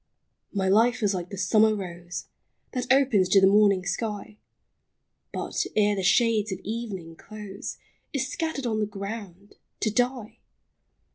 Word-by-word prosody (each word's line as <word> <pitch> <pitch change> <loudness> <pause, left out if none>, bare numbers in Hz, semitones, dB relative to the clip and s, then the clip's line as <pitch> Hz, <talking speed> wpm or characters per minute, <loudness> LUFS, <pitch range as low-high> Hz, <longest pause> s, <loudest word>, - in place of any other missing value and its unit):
My 195 -2 0
life 230 +4 +3
is 205 -1 +3
like 180 -1 -4
the 200 - -7
summer 215 +4 +4
rose, 175 -3 -6 0.5
That 250 -1 -2
opens 250 -9 +4
to 195 - +6
the 190 - +6
morning 200 -2 +4
sky, 210 +2 -4 0.9
But, - - -2
ere 210 -1 +3
the 195 - -2
shades 215 +1 +3
of 190 - -2
evening 200 -7 -5
close, 210 +1 -8 0.3
Is 270 -2 -1
scattered 305 -2 -3
on 220 -2 0
the 210 - 0
ground 200 -1 -8
— - - -51
to 215 - +1
die 245 -1 -1
210 Hz, 150 wpm, -26 LUFS, 190-230 Hz, 0.9 s, to